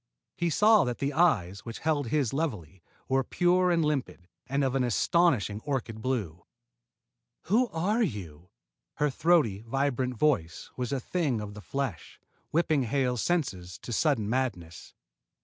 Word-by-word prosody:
He 175 0 0
saw 210 +6 +5
that 125 -1 -2
the 140 +1 -2
eyes 105 - +2
which 115 +2 -8
held 150 -4 0
his 135 -1 0
levelly 105 - -3 0.3
were 135 0 +2
pure 180 +5 +2
and 165 -2 +2
limpid, 135 -12 -2 0.2
and 140 +2 0
of 130 -1 0
an 135 -1 +1
astonishing 120 - +2
orchid 125 -6 -3
blue. 105 -10 -3 1.0
"Who 230 +8 +2
are 205 +6 0
you?" 90 - -4 0.5
Her 150 -1 +1
throaty, 145 - +2
vibrant 130 +1 -1
voice 85 - 0
was 125 -2 -3
a 140 - 0
thing 140 -4 -1
of 105 -1 -6
the 105 - -10
flesh, 130 - -4 0.3
whipping 155 -2 +2
Hale's 125 -1 0
senses 95 - -2
to 120 - -7
sudden 120 -5 +1
madness. 110 -9 -3
130 Hz, 150 wpm, -28 LUFS, 105-155 Hz, 1.0 s, saw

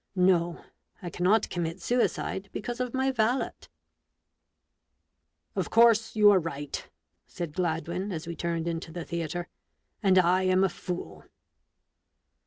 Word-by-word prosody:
No; 175 -2 +2 0.4
I 175 - -5
cannot 200 +5 +2
commit 170 0 -3
suicide, 205 -5 -1
because 240 +3 -5
of 250 0 -2
my 265 +1 +2
valet." 245 +1 +1 1.1
" - - -52
Of - - -1
course 230 -1 +4
you 210 -1 +7
are 195 - +5
right," 145 -4 -5 0.4
said 170 -4 -6
Gladwin, 175 +3 -2
as 160 -3 -4
we 170 0 -5
turned 170 -1 -2
into 165 -1 -4
the 170 0 -6
theatre; 170 +1 -3 0.3
" - - -49
and 190 -3 +4
I 180 +1 +4
am 185 0 +3
a 195 - +3
fool 180 0 -6
180 Hz, 140 wpm, -28 LUFS, 170-210 Hz, 1.1 s, you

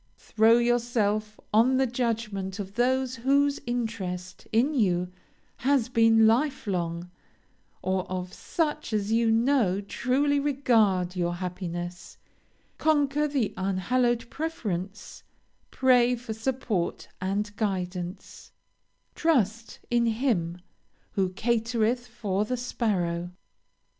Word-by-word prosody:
Throw 225 +1 +4
yourself 230 -3 0
on 245 +5 +5
the 265 - +3
judgment 225 -6 -2
of 195 -2 -6
those 255 +2 +1
whose 280 +4 +2
interest 190 -7 -4
in 245 +7 +2
you 180 -8 +1 0.5
has 265 -2 +1
been 225 -2 +5
life 260 +6 +2
long, 175 -2 -3 0.7
or 185 0 -1
of 185 0 -4
such 305 -4 -2
as 210 0 0
you 230 0 +3
know 225 -4 +3
truly 270 +7 +1
regard 225 -10 +2
your 175 -1 -1
happiness; 175 -1 -6 0.6
conquer 295 -1 +2
the 275 -7 -1
unhallowed 230 +6 0
preference; 205 - -4 0.5
pray 250 -1 +4
for 235 -2 -6
support 220 -5 -2
and 205 +2 -2
guidance; 185 -3 -4 0.6
trust 230 - 0
in 235 -1 +3
Him 220 -8 0 0.5
who 195 -3 0
'catereth 230 +3 0
for 210 -4 -2
the 250 +4 -2
sparrow.' 180 -8 -1
225 Hz, 105 wpm, -27 LUFS, 190-250 Hz, 0.7 s, on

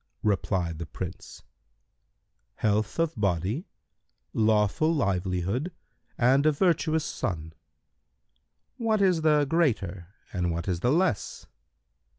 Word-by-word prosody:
Replied 95 -5 0
the 85 - -5
Prince, - - -8 1.1
"Health 110 0 0
of 165 -1 +1
body, 100 - -1 0.7
lawful 110 +7 +2
livelihood 100 - -1 0.5
and 130 +4 +4
a - - +6
virtuous 160 -1 +1
son." 80 -4 -3 1.3
Q 230 - -5
"What 215 -2 +3
is 180 -4 +3
the 150 -2 +4
greater 110 - 0 0.3
and 90 -2 0
what 85 +2 -3
is 90 -3 0
the 120 +7 +2
less?" 165 - 0
110 Hz, 110 wpm, -27 LUFS, -, 1.3 s, a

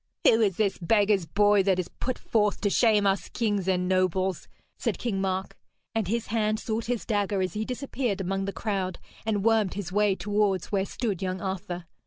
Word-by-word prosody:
'Who 225 - +5
is 195 -5 +2
this 205 -3 +1
beggar's 200 -1 +2
boy 205 +3 +4
that 190 -1 +2
is 185 - -1
put 255 0 -2
forth 210 -2 +1
to 205 - +1
shame 215 -3 +4
us 195 0 +1
kings 205 -5 -1
and 180 -1 +1
nobles?' 185 -1 +1 0.3
said - - -2
King 205 -5 -2
Mark, 190 0 -2 0.4
and 220 -4 0
his 230 +3 -1
hand 215 -1 +1
sought 225 0 -2
his 240 -1 -2
dagger 205 -2 0
as 185 -1 -1
he 215 0 -2
disappeared 250 -4 -2
among 195 +1 -1
the 200 - -2
crowd 195 -4 -2 0.3
and 210 -2 0
wormed 220 -4 +3
his 195 -4 -4
way 205 0 +3
towards 205 -3 0
where 195 -2 +1
stood 205 -3 -3
young 185 0 -2
Arthur. 185 -2 -4
200 Hz, 195 wpm, -27 LUFS, 190-215 Hz, 0.4 s, Who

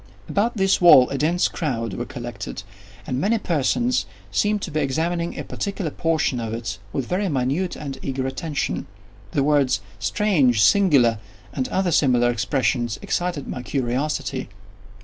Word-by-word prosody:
About 225 +3 0
this 195 -1 +2
wall 150 -8 +8
a 140 - -1
dense 170 +4 +2
crowd 115 - -3
were - - -4
collected, - - -6 0.4
and 130 +1 -2
many 225 +4 +2
persons 210 - 0 0.2
seemed 210 -1 +1
to 170 - -4
be 155 - -1
examining 165 +5 -1
a - - -3
particular 195 -5 -4
portion 160 -6 0
of 115 -1 -3
it 100 -4 -5
with 135 - -2
very 190 +5 -1
minute 145 +6 -1
and 140 -3 -6
eager 130 -1 -3
attention. 135 +3 -3 0.5
The 140 - +2
words 140 -4 +3 0.2
"strange!" 135 - +2
"singular!" 135 - +4 0.3
and 130 -2 -1
other 190 -2 0
similar 125 -5 +3
expressions, 120 +1 0
excited 175 -5 -2
my 125 - -5
curiosity. 130 +1 -2
145 Hz, 150 wpm, -23 LUFS, 125-175 Hz, 0.5 s, wall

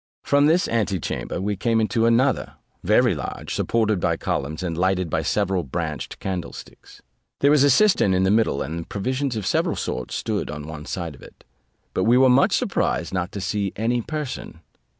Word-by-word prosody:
From 145 +1 +3
this 170 +4 +3
antechamber 105 -6 -2
we 100 +2 -1
came 115 +4 +1
into 115 +1 +1
another, 125 +3 +2 0.3
very - - +4
large, - - -5
supported 110 -4 +1
by - - 0
columns, 75 +5 -3
and 85 -2 -2
lighted 90 -1 0
by - - +1
several 95 -3 0
branched 80 +1 -4
candlesticks. 95 -3 -7 0.4
There 140 - +5
was 150 -2 +5
a 145 - +5
cistern 190 - +4
in 95 0 +2
the 95 - +3
middle, 110 -9 +2
and 80 +3 -6
provisions 130 +5 -2
of 105 -3 -3
several - - +1
sorts 65 - -4
stood - - -2
on 75 0 -6
one 80 -1 -8
side 85 -4 -4
of 65 - -16
it; - - -16 0.5
but - - 0
we 120 +2 +5
were 130 0 +6
much 125 +2 +4
surprised - - -1
not 90 +1 -2
to 100 - -4
see 100 0 -2
any 120 +3 0
person. 150 +1 -6
100 Hz, 185 wpm, -23 LUFS, 90-120 Hz, 0.5 s, were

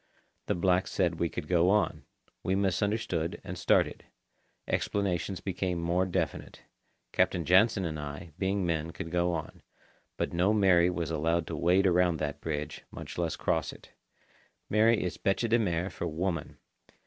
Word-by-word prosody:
The - - +1
blacks 90 +1 +1
said 85 -3 0
we 85 - +1
could 75 - -6
go 90 0 +3
on. 100 -4 +1 0.4
We 95 - 0
misunderstood, 95 -2 0
and - - -6
started. - - +2 0.6
Explanations 95 -2 -1
became 90 -2 -2
more 85 +2 +1
definite. 90 -4 -3 0.5
Captain 85 -3 +1
Jansen 95 +3 +4
and 80 -2 -3
I, 75 +3 -7
being 95 0 0
men, 80 -1 -1
could 80 - -6
go 90 0 +1
on. 85 - -5 0.6
But - - -2
no 90 +5 +3
Mary 90 -4 +5
was 85 -2 -2
allowed 80 +1 +1
to 80 - -5
wade 90 +5 +3
around 90 -2 +3
that 75 -2 -4
bridge, 75 -2 -4
much - - -8
less 85 -2 0
cross - - 0
it. - - -15 0.8
"Mary" 110 +2 +4
is 90 -2 -4
bêche 100 +4 +1
de 115 +1 +3
mer 90 -3 -1
for - - -4
woman. 85 0 -3
90 Hz, 160 wpm, -29 LUFS, 85-95 Hz, 0.8 s, Mary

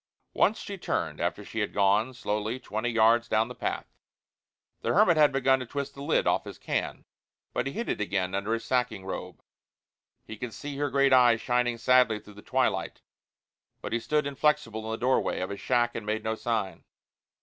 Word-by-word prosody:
Once 220 - +3
she 200 -1 -7
turned - - -2
after - - -2
she 115 - -5
had 105 - -2
gone 100 +5 +3
slowly 110 -1 -3
twenty 120 -1 -3
yards 115 +1 +4
down 110 0 +1
the - - -6
path. - - -3 1.0
The - - 0
hermit 190 -4 +5
had 150 -2 +5
begun 135 0 +3
to 125 - -5
twist 140 +1 -4
the 140 - -10
lid 150 +3 +1
off - - +1
his - - -8
can, - - -3 0.5
but - - -1
he 135 - -4
hid 235 - -4
it - - -2
again 95 -2 -1
under 100 +3 -2
his 115 0 -2
sacking 120 -5 -1
robe. 95 - -6 0.8
He 110 - -8
could 120 0 -6
see 145 -1 -6
her 145 0 0
great 140 0 +3
eyes 120 -3 +6
shining 120 0 0
sadly 125 -3 +4
through 105 - -15
the 105 - -13
twilight; - - -1 0.8
but - - -6
he 120 - +1
stood 150 +5 0
inflexible 140 -5 0
in - - -5
the 110 - -2
doorway 130 +2 +1
of 95 +2 -3
his 100 - -6
shack 120 -1 +1
and 115 - -5
made 110 +1 -2
no 110 - -1
sign. 110 -6 -2
120 Hz, 200 wpm, -28 LUFS, 110-135 Hz, 1.0 s, eyes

